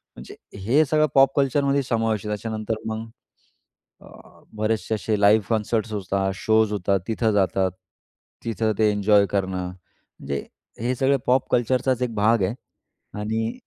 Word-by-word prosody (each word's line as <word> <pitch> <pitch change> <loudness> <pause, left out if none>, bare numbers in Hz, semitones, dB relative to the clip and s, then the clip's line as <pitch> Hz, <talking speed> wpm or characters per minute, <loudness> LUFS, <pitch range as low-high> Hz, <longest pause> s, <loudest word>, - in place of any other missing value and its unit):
म्हणजे - - -11 0.3
हे 145 +7 +4
सगळं 155 +2 +2
पॉप 135 0 +5
कल्चर 140 +1 +2
मध्ये 140 0 +1
समावेश 115 -4 0
आहे. 105 - -4
त्याच्यानंतर 110 +1 -3
मग, 110 +1 -4 1.5
बरेचसे 110 +1 -1
असे 105 0 -1
लाइव्ह 105 +1 +5
कंसर्ट्स 110 0 -1
होतात, 95 -1 -1
शोज 110 +1 +2
होतात 100 0 0
तिथं 110 0 +1
जातात. 95 -2 +1 0.7
तिथं 110 -1 0
ते 110 -1 +3
एन्जॉय 105 0 +3
करणं. 95 -2 -1
म्हणजे 90 -5 -9 0.4
हे 125 +2 0
सगळं 135 +2 +2
पॉप 130 +1 +2
कल्चरचाच 125 +1 +1
एक 120 -2 -1
भाग 110 +1 +3
आहे. 100 +5 -1 0.7
आणि 110 +2 -2
110 Hz, 140 wpm, -23 LUFS, 105-120 Hz, 1.5 s, पॉप